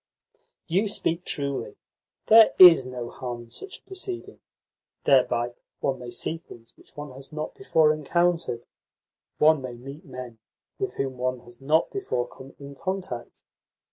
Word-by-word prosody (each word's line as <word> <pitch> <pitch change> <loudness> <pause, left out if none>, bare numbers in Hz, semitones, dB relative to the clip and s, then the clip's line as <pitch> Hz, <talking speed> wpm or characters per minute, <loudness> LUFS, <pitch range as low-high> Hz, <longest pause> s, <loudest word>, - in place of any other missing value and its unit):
"You 190 +6 +1
speak 175 -3 -1
truly. 140 - -3 0.5
There 225 0 +7
IS 165 -8 +9
no 125 -2 -6
harm 120 -2 -6
in 115 - -18
such 395 - -8
a - - -27
proceeding. 375 -1 -6 0.6
Thereby 120 -3 +3 0.3
one 135 -2 -1
may 125 -1 -7
see 140 +7 -3
things 115 -8 -15
which - - -18
one 145 -1 -6
has 135 +3 -11
not 155 0 -5
before 160 - +3
encountered, 165 -4 0 0.7
one 155 -1 +5
may 130 -2 -6
meet 135 +5 -10
men 125 -4 -9 0.4
with 395 -1 -3
whom 135 -2 -3
one 130 0 -1
has 120 +1 -15
not 155 +4 +2
before 380 - -2
come 135 +2 -13
in 140 0 -10
contact. 180 -7 -5
140 Hz, 150 wpm, -26 LUFS, 125-170 Hz, 0.7 s, IS